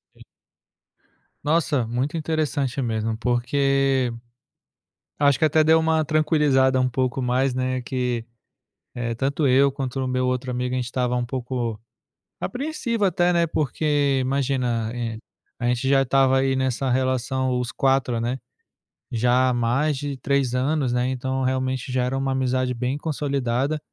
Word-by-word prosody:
Sim. - - -20 1.2
Nossa, 150 -5 +1
muito 130 +7 -2
interessante, 150 -4 -1
mesmo. 110 -2 -1
Porque, 130 +2 +1 1.1
acho 140 -2 +4
que 155 - +3
até 155 +1 +4
deu 160 +1 +5
uma 160 0 +2
tranquilizada 150 -4 +2
um 130 0 +2
pouco 130 +1 -1
mais, 125 +2 +1
né, 130 0 -1
que, 125 -2 -2 0.7
eh, 115 -1 -3
tanto 140 +4 0
eu 135 +2 +4
quanto 135 -1 -4
o 130 - -1
meu 130 0 0
outro 125 0 -2
amigo, 125 0 -2
a - - 0
gente 125 - -2
estava 125 0 -1
um 125 0 -1
pouco 120 -3 -3 0.6
apreensivo 245 -2 -2
até, 180 -2 +2
né, 170 -1 +2
porque, 145 -2 0
imagina, 125 -4 0
eh, 115 -2 -4 0.4
a 120 - -2
gente 125 +2 0
já 135 0 +4
estava 135 0 +3
aí 135 0 +1
nessa 130 0 0
relação, 130 0 0
os 125 -1 -3
4, 135 -3 +1
né, 120 +3 -2 0.7
já 125 +2 +3
há - - +1
mais 125 +5 +1
de 145 -1 -4
3 135 -2 0
anos, 130 0 0
né, 125 +1 +1
então, 130 +1 -2
realmente, 130 0 -1
já 125 0 +1
era 125 +2 -1
uma 135 0 -1
amizade 130 -1 0
bem 125 +4 -2
consolidada. 140 -2 -1
130 Hz, 155 wpm, -23 LUFS, 125-140 Hz, 1.2 s, deu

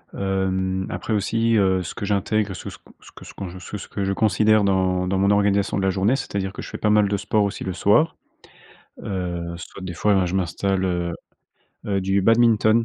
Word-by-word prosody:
Hem, 95 -1 -1
après, 110 - -3
aussi, 115 +2 +1
heu, 95 -2 +2
ce 85 - -6
que 110 - -7
j'intègre, 100 0 0
ce - - -9
que - - -5 0.3
ce - - -15
que - - -12
ce - - -11
s - - -19
qu'on 95 -1 -7
ce - - -11
que 105 - -3
ce - - -9
que 100 - -4
je 95 0 0
considère 110 +1 +3
dans 95 -2 +1
dans 95 0 0
mon 100 +1 +3
organisation 100 -1 +2
de 95 - -1
la 95 - +2
journée, 100 +7 +2
c'est-à-dire 95 -7 -3
que - - -8
je - - -8
fais - - -7
pas 105 - +1
mal 105 -1 +4
de 100 - 0
sport, 105 +1 +1
aussi, 100 - -3
le 95 - -3
soir. 155 - +3 0.9
Heu, 85 -3 -4
soit 90 +2 -10
des 90 -2 -5
fois, 105 +4 +2
ben, 95 - +2
je 90 - -3
m'installe 95 +1 -1
heu 90 -2 -1 0.7
heu, 100 -2 0
du 95 +1 +1
badminton. 115 0 +4
95 Hz, 230 wpm, -22 LUFS, 95-105 Hz, 0.9 s, mal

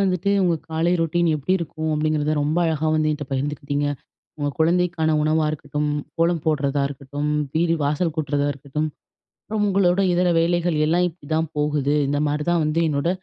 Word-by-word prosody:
வந்துட்டு 190 0 +1
உங்க 175 -2 +2
காலை 165 +2 +1
ரொட்டீன் 165 +1 +1
எப்டி 150 +5 -1
இருக்கும் 160 -1 -4
அப்டிங்கிறத 155 0 0
ரொம்ப 155 +4 0
அழகா 160 -1 0
வந்து 155 0 +2
என்ட்ட 150 -1 -4
பகிர்ந்துகிட்டீங்க. 145 +1 -2 0.5
உங்க 145 -1 -1
குழந்தைக்கான 170 0 +2
உணவா 155 +1 +2
இருக்கட்டும், 150 0 -3 0.3
கோலம் 165 -1 +1
போடுறதா 145 -2 +1
இருக்கட்டும், 145 +1 -4 0.2
வீடு 165 +1 +2
வாசல் 150 +3 0
கூட்டுறதா 145 -2 0
இருக்கட்டும், 145 +2 -3 0.5
அப்புறம் 210 0 -2
உங்களோட 195 -1 +3
இதர 180 +1 +2
வேலைகள் 170 -1 +1
எல்லாம் 175 +3 +2
இப்டித்தான் 160 -1 -3
போகுது. 150 -1 +1
இந்த 145 +1 0
மாரிதான் 150 +3 0
வந்து 155 +2 0
என்னோட 145 +2 0
155 Hz, 155 wpm, -22 LUFS, 145-170 Hz, 0.5 s, உங்களோட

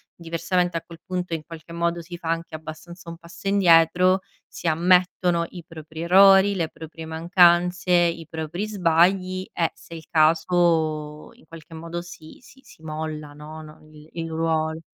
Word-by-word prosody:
diversamente 170 +1 -1
a 165 - -6
quel 165 -1 -13
punto 180 -2 -4
in 160 - -2
qualche 165 0 -11
modo 170 0 -1
si 175 +1 -9
fa 165 -1 -6
anche 165 0 -3
abbastanza 170 +2 -10
un 165 - -8
passo 170 +3 -11
indietro, 180 -1 +4 0.3
si 175 - -7
ammettono 175 +1 +2
i 175 -2 -10
propri 160 0 -10
errori, 195 +3 +6
le 165 -3 -1
proprie 160 0 -10
mancanze, 175 +2 +3
i 170 -2 +2
propri 160 +6 -4
sbagli 185 0 +1
e 165 -1 0
se 170 - -15
è - - -6
il 160 - -13
caso 160 -2 +1
in - - -23
qualche 165 0 -13
modo 170 +2 -6
si 170 -2 -13
si 265 +2 -19
si 160 - -19
molla, 155 -1 -6
no 155 +2 -10
no, 155 0 -14
il 150 +1 -16
il 165 -1 -5
ruolo. 160 0 -1
170 Hz, 170 wpm, -23 LUFS, 160-175 Hz, 0.3 s, errori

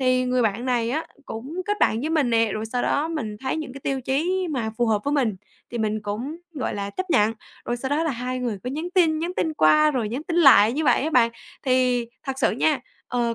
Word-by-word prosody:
thì 255 -1 +2
người 250 0 +1
bạn 225 +2 0
này 240 -2 +1
á 310 +5 -2 0.2
cũng 280 +11 -5
kết 415 0 0
bạn 220 - +3
với 305 +5 -2
mình 300 -6 +2
nè, 225 -2 +2
rồi 215 +1 -3
sau 245 +2 -2
đó 295 +3 +1
mình 240 -11 -4
thấy 260 +2 -2
những 310 -5 -5
cái 275 - -10
tiêu 270 0 -2
chí 340 +9 0
mà 240 -6 -2
phù 240 - +2
hợp 210 -2 +1
với 285 - 0
mình 245 -9 +1 0.3
thì 240 - -4
mình 215 -1 -1
cũng, 225 +9 -4 0.2
gọi 275 - -2
là, 200 0 -4
chấp 370 - -5
nhận. 215 -6 +4 0.3
Rồi 240 - -2
sau 265 +2 -4
đó 290 +3 +1
là 320 - +1
hai 250 0 -3
người 240 -5 -2
cứ 250 - -2
nhắn 310 +6 -4
tin, 325 -4 +4
nhắn 340 +3 -3
tin 320 -1 0
qua 305 - +5
rồi 245 -7 -1
nhắn 250 +7 -4
tin 335 +1 -3
lại 255 -10 +7
như 310 +4 -1
vậy 250 -2 +3
á 310 - -1
bạn. 240 -5 +4 0.3
Thì 255 -2 +2 0.2
thật 270 - -2
sự 270 - +3
nha, 275 +4 +1 0.3
ờ, 240 -2 0
255 Hz, 255 wpm, -24 LUFS, 230-305 Hz, 0.3 s, lại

